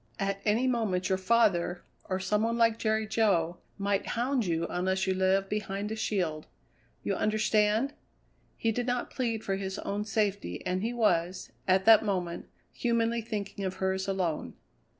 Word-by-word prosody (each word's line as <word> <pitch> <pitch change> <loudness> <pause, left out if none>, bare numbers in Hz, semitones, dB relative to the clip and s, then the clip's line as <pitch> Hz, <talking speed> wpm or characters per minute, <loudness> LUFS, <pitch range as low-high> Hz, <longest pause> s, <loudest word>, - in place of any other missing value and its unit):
At 195 0 -2
any 220 +4 +2
moment 215 -8 0
your 190 - +2
father, 190 -4 +2 0.2
or 185 0 -2
some 210 +2 +1
one 230 +1 0
like 230 -1 +3
Jerry 220 0 +1
Jo, 195 -6 +1 0.2
might 200 0 0
hound 245 -2 +1
you 165 -1 0
unless 190 +1 0
you 190 - +1
live 190 +1 +2
behind 205 0 -3
a - - -2
shield. 180 -8 -1 0.6
You - - 0
understand?" 215 +4 +2 0.6
He 225 - +1
did 245 +2 -2
not 245 0 -1
plead 230 -4 -2
for 195 -1 -1
his 190 0 -4
own 205 +1 -2
safety, 200 - -1
and 185 +1 0
he 225 +3 -1
was, 185 -7 0 0.2
at 190 0 +3
that 225 0 +8
moment, 180 -5 -2 0.2
humanly 235 0 0
thinking 205 -3 -5
of 190 -1 -2
hers 190 0 -1
alone. 185 -5 -2
200 Hz, 165 wpm, -29 LUFS, 190-225 Hz, 0.6 s, that